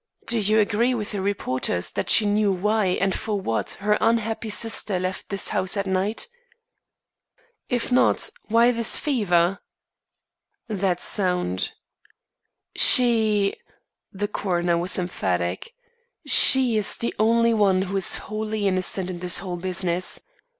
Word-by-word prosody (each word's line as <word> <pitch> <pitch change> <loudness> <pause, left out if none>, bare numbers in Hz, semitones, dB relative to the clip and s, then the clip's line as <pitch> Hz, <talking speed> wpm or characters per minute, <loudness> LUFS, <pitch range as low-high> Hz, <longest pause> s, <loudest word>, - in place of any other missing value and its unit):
Do 235 0 0
you 215 +1 +1
agree 225 +4 +1
with 210 -3 -5
the 205 -2 -4
reporters 130 - -2
that - - -4
she 220 - +6
knew 205 0 +1
why 210 +3 0
and 190 +1 -1
for 210 -2 -4
what 115 -12 -3
her 210 0 +2
unhappy 225 -1 -1
sister 215 -2 0
left 185 +1 -5
this 195 -1 0
house 185 +2 -1
that 200 0 -2
night?" 195 - -3 1.4
"If 245 0 -3
not, 250 - +2 0.2
why 230 +2 +3
this 230 -2 +1
fever?" 195 - 0 1.1
"That's 190 -4 -2
sound." 180 - -1 1.0
"She 220 -5 +5 0.3
" - - -63
the 205 +1 -4
coroner 175 -4 -2
was 175 +2 -1
emphatic, 90 - -3 0.5
"she 255 -4 +6
is 210 - +1
the 235 - -3
only 230 +1 +2
one 195 -3 +2
who 195 +1 -6
is 190 - +3
wholly 215 -1 -3
innocent 185 0 -1
in 180 -2 -7
this 180 -1 0
whole 180 -1 -5
business. 180 0 -2
200 Hz, 135 wpm, -22 LUFS, 185-220 Hz, 1.4 s, she